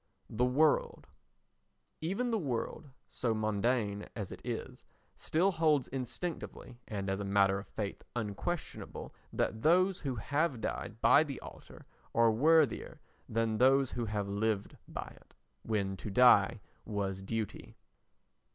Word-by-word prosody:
The 125 +3 +2
World 145 +4 +2 1.0
Even 200 +10 -1
the 225 - +1
world, 135 - -3 0.2
so 115 -3 -1
mondain 110 0 0
as 105 -5 -5
it - - -8
is, - - -5 0.3
still 180 +5 +1
holds 155 -6 +2
instinctively 135 -1 -5
and 100 -2 -4
as 95 +1 -1
a - - -2
matter 100 0 +3
of 100 - -10
faith 105 -2 -5
unquestionable 120 - -4 0.2
that 110 - -1
those 180 +5 +4
who 135 -4 -3
have 145 +3 0
died 110 +1 -4
by 150 - +7
the 140 -4 -6
altar - - -12 0.3
are 115 -1 +5
worthier 150 +3 +3 0.3
than 110 -1 0
those 135 +1 +4
who 120 - -2
have 105 -2 -2
lived 100 0 -1
by - - -6
it, - - -26 0.3
when 100 -3 -1
to 105 - -6
die 105 -2 +5 0.2
was 100 -3 -3
duty. 110 +2 -4
115 Hz, 135 wpm, -32 LUFS, 105-145 Hz, 1.0 s, by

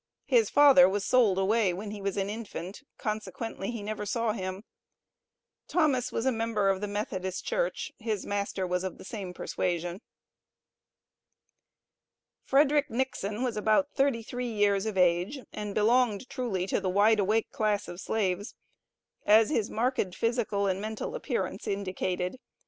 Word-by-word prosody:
His 465 -3 +3
father 280 -5 +7
was 200 +1 -1
sold 220 -5 +4
away 195 0 +2
when 205 +3 -6
he 210 -1 -7
was 200 0 -2
an 195 -1 0
infant, 205 -1 -6 0.2
consequently 215 -1 -4
he 230 -3 -5
never 210 0 -4
saw 230 +2 0
him. 190 -1 -5 1.0
Thomas 280 -8 +1
was 230 - -2
a 265 - +3
member 225 -3 0
of 195 0 0
the 210 - -2
Methodist 190 -3 -3
Church; - - -1
his 215 -3 -2
master 200 -2 -2
was 180 0 -1
of 190 - -4
the - - -12
same 200 -4 -6
persuasion. 175 0 -3 2.4
FREDERICK 290 +1 +3
NIXON 230 -3 -2
was 245 -3 -1
about 215 +7 +2
thirty 270 -5 +1
three 245 +1 -4
years 205 -1 +2
of 210 -3 -3
age, 180 +9 +2
and 210 -1 -5
belonged 230 +1 +2
truly 240 -9 -2
to - - -1
the 190 - -1
wide 210 +3 +4
awake 215 +3 +1
class 210 -1 0
of 175 - -8
slaves, 205 -1 -1 0.7
as 215 +3 +6
his 220 -8 0
marked 230 -5 -1
physical 230 -4 0
and 190 0 0
mental 220 - -4
appearance - - -3
indicated. 185 0 -2
210 Hz, 150 wpm, -29 LUFS, 195-235 Hz, 2.4 s, father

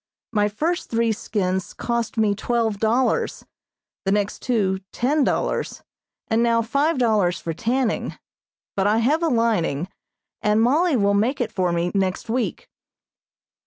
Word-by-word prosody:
My 210 -2 +2
first 320 - -2
three 230 0 +1
skins 190 -3 -2
cost 235 -1 -2
me 215 -2 +3
twelve 220 -1 -1
dollars, 235 +4 +1 0.6
the 195 - 0
next 205 0 0
two 200 -7 0
ten 285 +5 +1
dollars, - - -1 0.4
and 225 +1 +2
now 230 -1 +3
five 285 +7 +1
dollars 210 -8 +2
for 165 - -4
tanning, 235 +6 -1 0.6
but 195 0 +1
I 210 +2 +3
have 280 +8 +2
a 335 - +2
lining, 210 - +1 0.5
and 210 0 +2
Mollie 290 +6 +3
will 200 -2 +2
make 225 +7 +1
it 235 -4 -1
for 180 -2 0
me 170 +1 0
next 190 +2 -1
week. 245 0 -2
225 Hz, 145 wpm, -23 LUFS, 200-245 Hz, 0.6 s, me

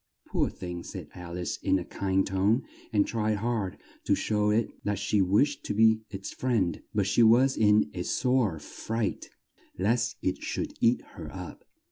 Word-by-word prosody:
"Poor - - +1
thing!" 90 -1 -6
said - - -8
Al 90 -1 -7
ice 90 - -3
in 95 - +1
a 90 - -4
kind 95 0 0
tone 100 +6 +2 0.3
and 105 -3 +3
tried 110 -2 0
hard 110 -4 -2 0.3
to - - +3
show 105 -1 +1
it 110 +2 +2 0.2
that 105 -1 -1
she 100 +1 +1
wished 120 +10 +2
to 105 - -2
be 110 0 +5
its 95 -2 -6
friend, 110 -10 0
but 100 -2 +1
she 100 +5 +3
was 125 +4 +5
in 105 -7 +4
a - - -4
sore 125 -9 +1
fright, 110 +8 -4 0.5
lest 115 +5 +1
it 95 - -1
should - - -3
eat 115 +2 +3
her - - -8
up. - - -9
105 Hz, 175 wpm, -28 LUFS, 95-115 Hz, 0.5 s, be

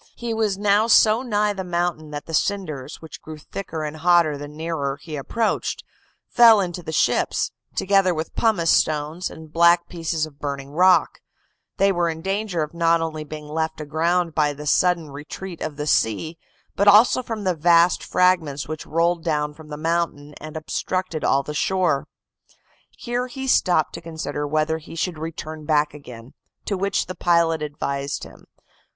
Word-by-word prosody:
He 235 -1 -4
was 215 -3 0
now 205 +2 +3
so 220 0 +5
nigh 210 -4 0
the 190 -1 -5
mountain 175 -3 -2
that 145 -1 -6
the 165 - -9
cinders, 155 -7 -2
which 160 - -10
grew 155 0 -9
thicker 160 0 -6
and 155 +1 -5
hotter 170 -2 +3
the 145 +1 -7
nearer 150 -2 -3
he 155 -3 -8
approached, 215 +11 -2 0.4
fell 230 -3 +7
into 175 -2 -3
the 160 - -6
ships, 160 - +1 0.2
together 195 -1 +3
with 160 -1 -4
pumice 200 -8 +2
stones, 155 +3 +1
and 160 -1 -12
black 170 +1 +4
pieces 165 -2 -2
of 145 -2 -15
burning 140 -1 -5
rock; 180 +4 +3 0.6
they 195 0 +4
were 175 -2 +1
in 160 0 -6
danger 195 -4 -1
of 150 - -7
not 170 0 +3
only 160 -1 -3
being 150 0 -9
left 160 +1 -3
aground 165 +3 0
by 150 -2 +1
the 150 +1 -9
sudden 170 0 +2
retreat 165 +5 -8
of 155 -2 -4
the 150 0 -4
sea, 155 +5 0 0.4
but 200 - +1
also 215 +5 +6
from 225 -4 -5
the 185 -2 +1
vast 170 +2 +4
fragments 170 -6 +1
which 155 0 -6
rolled 170 +1 +1
down 150 -2 -1
from 155 0 -14
the 150 -1 -7
mountain, 160 -2 -2
and 155 0 -7
obstructed 175 +1 -3
all 140 0 +2
the 150 - -6
shore. 175 -2 0 0.8
"Here 245 +1 -3
he 265 +1 -6
stopped 180 -10 +2
to - - -7
consider 155 -3 -4
whether 155 +2 0
he 160 - -11
should 165 -1 -2
return 155 -1 -6
back 150 -1 +2
again; 125 -4 -12 0.3
to 200 - -1
which 195 +1 0
the 185 - -6
pilot 170 -3 +2
advised 140 -2 -3
him. - - -13
165 Hz, 175 wpm, -22 LUFS, 150-185 Hz, 0.8 s, fell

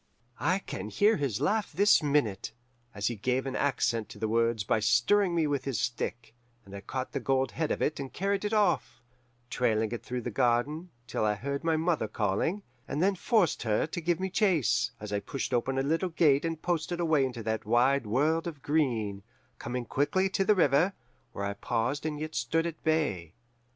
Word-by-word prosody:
"I 185 +2 +2
can 105 - -6
hear 210 - +3
his 135 -9 -1
laugh 215 0 0
this 205 +2 +5
minute, 140 -9 0 0.4
as 100 - -3
he 120 - 0
gave 125 +5 -1
an 135 -1 -3
accent 115 -5 0
to - - -10
the 110 +1 -2
words 115 -1 +1
by 105 - +1
stirring 120 - +3
me 165 -2 +2
with 145 -2 -1
his 135 -6 -1
stick, 120 0 -3 0.3
and 100 0 -10
I 100 - -7
caught 130 +4 -4
the 140 - -2
gold 135 +1 0
head 160 -2 -2
of - - -1
it 150 - -1
and 135 -2 -5
carried 200 +1 -1
it 210 - -1
off, 210 -5 +1 0.5
trailing 110 -3 +1
it 120 - -4
through 125 0 -4
the 120 - -4
garden, 130 - 0 0.2
till 110 - -2
I 105 -1 +2
heard 140 +8 -4
my 165 -1 +2
mother 160 -8 0
calling, 105 - -1 0.2
and 145 - -3
then 195 +4 +3
forced 195 - +1
her 110 -3 +1
to 160 +2 -5
give 170 +1 0
me 190 0 -2
chase, 160 - +2
as 105 -1 -6
I 100 - +1
pushed 130 +6 -4
open 130 +2 0
a 135 - +1
little 165 +6 0
gate 150 -3 +3
and 165 -1 -2
posted 175 0 -2
away 160 -5 +3
into 125 -3 -3
that 110 0 -2
wide 120 +2 +3
world 155 +9 +1
of 150 -5 -7
green, 115 -10 0 0.4
coming 120 0 -4
quickly 165 +10 +1
to 195 - +1
the 210 +2 +4
river, 165 +2 +3 0.4
where 100 - -4
I 100 - -2
paused 120 +8 -2
and 150 -1 -4
stood 155 +8 0
at 165 -2 -5
bay. 140 - 0
140 Hz, 200 wpm, -29 LUFS, 115-165 Hz, 0.5 s, this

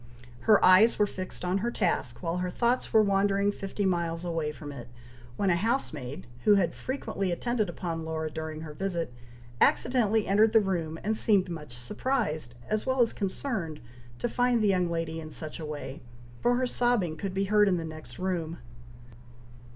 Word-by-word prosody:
Her 210 - +7
eyes 185 +5 +7
were 210 - +4
fixed 185 -2 -5
on 180 +2 +1
her 235 +4 -1
task, 170 - -1
while 170 +1 -1
her 180 0 -1
thoughts 240 +6 0
were 220 -2 +6
wandering 200 0 +2
fifty 200 0 -3
miles 170 -2 0
away 165 -3 -1
from 150 -1 -8
it, 120 -4 -9 0.5
when 195 -2 +2
a - - +4
housemaid, 170 - -2 0.2
who 210 - +6
had 175 -4 +2
frequently 200 -8 -3
attended 215 +3 -1
upon 165 -2 -4
Laura 160 -1 -3
during 160 0 -5
her 155 -2 -7
visit, 170 -5 -2 0.5
accidentally 225 -4 +3
entered 215 +3 +4
the 225 - +8
room, 170 -6 -1
and 220 +2 +1
seemed 200 -4 +3
much 150 -7 -7
surprised, 155 - -2
as 215 0 0
well 260 0 0
as 235 - +3
concerned, 190 - -3 0.4
to - - -1
find 245 -1 +2
the - - +4
young 180 -2 +2
lady 165 -1 -2
in 155 -1 -7
such 155 0 -7
a 160 - -5
way, 145 -2 -6 0.4
for 245 0 +3
her 255 +1 +1
sobbing 240 -9 +1
could 190 +3 -4
be 195 - +1
heard 210 +1 +4
in 185 -2 +3
the 165 - -3
next 155 -7 -8
room. 170 -3 -2
185 Hz, 180 wpm, -28 LUFS, 160-215 Hz, 0.5 s, the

